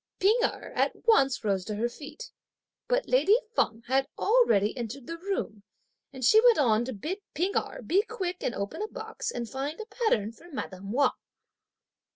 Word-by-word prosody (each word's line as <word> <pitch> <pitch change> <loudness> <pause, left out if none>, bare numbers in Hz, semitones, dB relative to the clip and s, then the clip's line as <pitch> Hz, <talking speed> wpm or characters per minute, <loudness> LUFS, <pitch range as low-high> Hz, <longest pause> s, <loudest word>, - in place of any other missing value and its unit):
P'ing 425 +6 +4
Erh - - -2
at - - +1
once 275 - +4
rose 195 -3 0
to 210 - -4
her 225 +3 0
feet; 290 - -10 0.6
but - - +1
lady 460 -4 +5 0.2
Feng 225 - +1
had 270 +2 +1
already 395 - +3
entered 240 +1 -6
the 335 +3 -6
room; 355 - -3 0.5
and 260 -2 -4
she 435 - +7
went 485 -2 +6
on 230 -5 +3
to 260 - -4
bid 315 - -4 0.2
P'ing 370 +5 0
Erh - - -2
be 380 +4 +3
quick 360 -2 -3
and 240 - -2
open 200 - -4
a 430 - -1
box 440 +1 -6
and 240 -1 -4
find 275 - -4
a 440 - -5
pattern 435 - 0
for 335 +9 -17
madame 195 -7 -6
Wang. 280 +5 +3
280 Hz, 185 wpm, -28 LUFS, -, 0.6 s, she